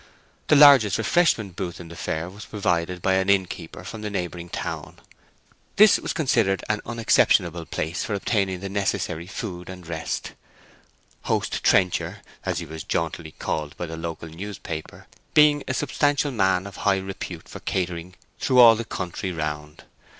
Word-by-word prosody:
The - - +5
largest 140 -9 +8
refreshment 115 - +2
booth 90 -3 -5
in 85 -2 -9
the 85 - -10
fair 80 +1 -3
was 100 +4 -10
provided 90 -3 -1
by 95 - +3
an 95 +1 +1
innkeeper 90 -4 -1
from 110 -1 -8
a 105 - -2
neighbouring 90 -3 -4
town. - - -5 0.8
This 210 0 +7
was - - -3
considered 115 - +1
an 105 -1 0
unexceptionable 90 -7 +2
place 80 +3 -3
for 105 - -2
obtaining 95 -3 0
the 100 - -4
necessary 90 -4 -2
food 90 -4 -6
and 90 -2 -9
rest: 80 -1 -4 0.9
Host - - -1
Trencher 90 -2 +2 0.2
(as - - -2
he - - -3
was 80 -1 -7
jauntily 80 -1 -3
called 75 -2 -4
by 90 - -3
the 80 -1 -6
local 80 0 -6
newspaper) 85 -2 -7 0.3
being 150 -1 +6
a 130 - -1
substantial 145 0 +1
man 95 -5 +2
of 100 - -9
high 100 -1 +2
repute 95 0 -6
for - - -9
catering 90 -1 -3 0.2
through 130 - +1
all 115 -2 +9
the 115 - -3
country 90 -1 -4
round. 75 -2 -5
95 Hz, 160 wpm, -24 LUFS, 85-110 Hz, 0.9 s, all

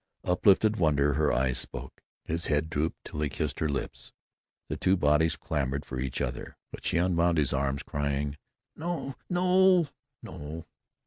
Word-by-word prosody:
Uplifted 100 +4 +4
wonder 75 -4 +3
her 75 +1 +2
eyes 65 0 +1
spoke. - - -6 0.2
His 85 +1 -2
head 75 +1 0
drooped 80 +1 -1
till 75 - -5
he 75 - 0
kissed 70 0 -3
her 80 - 0
lips. 70 - -4 0.6
The - - -3
two 95 +1 +2
bodies 80 0 +3
clamored 70 -2 -2
for 65 - -5
each 65 0 -3
other. - - -4
But - - -9
she - - +1
unwound 85 -1 +2
his 70 -4 +2
arms, 70 0 -1
crying, 70 0 -2 0.4
"No, 165 -4 -3 0.2
no, 180 -2 +4 0.3
no!" 80 +3 -7
75 Hz, 155 wpm, -29 LUFS, 70-90 Hz, 0.6 s, Uplifted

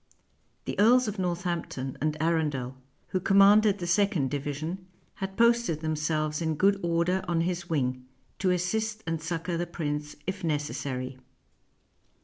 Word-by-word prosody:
The - - -4
earls 245 +3 +5
of 210 -1 -4
Northampton 170 -7 -2
and 155 0 0
Arundel, 150 -6 0 0.3
who 185 - 0
commanded 200 +2 +5
the 180 - -4
second 175 -6 +2
division, 150 +6 -4 0.3
had 195 0 -5
posted 235 -9 +3
themselves 155 0 -1
in 160 -1 0
good 195 +5 +3
order 170 +2 +1
on 170 -1 +1
his 175 0 -2
wing, 130 -5 -1 0.3
to 190 - +1
assist 215 +5 -1
and 165 -1 -2
succor 170 +1 -3
the 175 +1 -2
prince 150 -3 -4
if 190 0 -4
necessary. 140 -4 -3
170 Hz, 135 wpm, -28 LUFS, 150-190 Hz, 0.3 s, earls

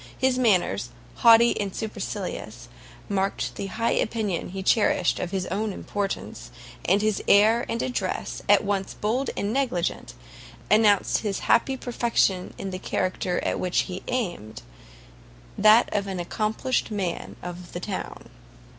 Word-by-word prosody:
His 260 -1 +1
manners, 175 - +2 0.3
haughty 230 -1 +6
and 195 -2 -4
supercilious, 220 -2 -5 0.4
marked 190 - -1
the 195 - -5
high 230 +4 -1
opinion 215 -7 -1
he 190 +1 -5
cherished 190 -3 +2
of 180 - -3
his 190 -1 -2
own 210 +2 -1
importance; 195 - -4 0.4
and 200 +4 +3
his 215 -2 +1
air 220 +4 +5
and 230 - -1
address, 250 - -3
at - - +6
once 195 -1 -2
bold 240 +6 -1
and 205 +2 -1
negligent, 180 - -1 0.6
announced 210 -2 +4
his 205 -3 -3
happy 265 +3 +3
perfection 235 -7 0
in 195 - -5
the 185 - -5
character 185 -1 -1
at - - -1
which 180 -1 +1
he 185 0 -6
aimed, 175 - -3 0.9
that 215 +3 +6
of 200 -1 -1
an 190 -2 -4
accomplished 215 +8 -1
man 195 -5 -3
of 175 0 -8
the 175 - -4
town. 190 +1 -6
200 Hz, 140 wpm, -25 LUFS, 185-225 Hz, 0.9 s, haughty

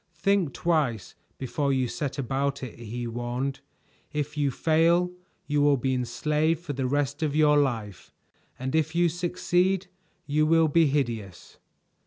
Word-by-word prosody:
Think 180 -4 +1
twice 145 - 0 0.2
before 140 +2 -1
you 130 -2 +1
set 140 +3 -4
about 140 +1 -1
it," 120 -2 -8
he 120 +1 -5
warned. 120 +4 -3 0.5
"If 150 0 -3
you 145 -2 +1
fail, 165 +5 +2 0.3
you 145 -1 +1
will 145 -1 +4
be 130 +1 0
enslaved 150 +5 0
for 155 -5 -5
the 130 -1 -1
rest 145 +2 -1
of 150 -2 0
your 150 -1 +5
life; 115 -9 -2 0.5
and 130 +1 -4
if 160 +1 +1
you 175 0 +4
succeed, 180 +2 0 0.4
you 155 +1 +2
will 165 0 +4
be 165 +1 +4
hideous. 115 -10 -3
145 Hz, 150 wpm, -26 LUFS, 130-160 Hz, 0.5 s, your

